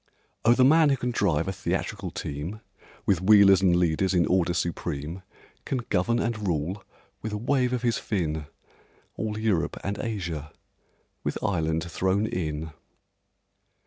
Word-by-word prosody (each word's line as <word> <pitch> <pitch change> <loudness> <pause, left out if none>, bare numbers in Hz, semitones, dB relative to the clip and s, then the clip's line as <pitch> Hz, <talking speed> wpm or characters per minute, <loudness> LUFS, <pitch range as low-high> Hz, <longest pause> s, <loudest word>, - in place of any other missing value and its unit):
Oh, 120 +1 +5
the 130 - +5
man 155 +2 +6
who 135 - +2
can 125 0 -2
drive 85 -8 +1
a - - 0
theatrical 95 +1 -3
team, 80 +10 -5 0.4
With 95 -4 +2
wheelers 100 -1 +7
and 90 -2 +4
leaders 90 +2 +1
in 85 -1 +4
order 90 -1 +2
supreme, 85 0 -3 0.4
Can 125 -3 -3
govern 100 +6 +2
and 110 -4 -2
rule, 85 +4 -2 0.4
with 110 -1 -4
a - - -1
wave 125 +2 +1
of 125 -1 -2
his 120 -1 +1
fin, 80 -7 -2 0.7
All 105 -1 -3
Europe 110 -6 0
and 100 +1 -3
Asia—with 85 -10 -6
Ireland 80 -4 0
thrown 95 +4 0
in! 80 -5 -3
95 Hz, 145 wpm, -26 LUFS, 85-110 Hz, 0.7 s, wheelers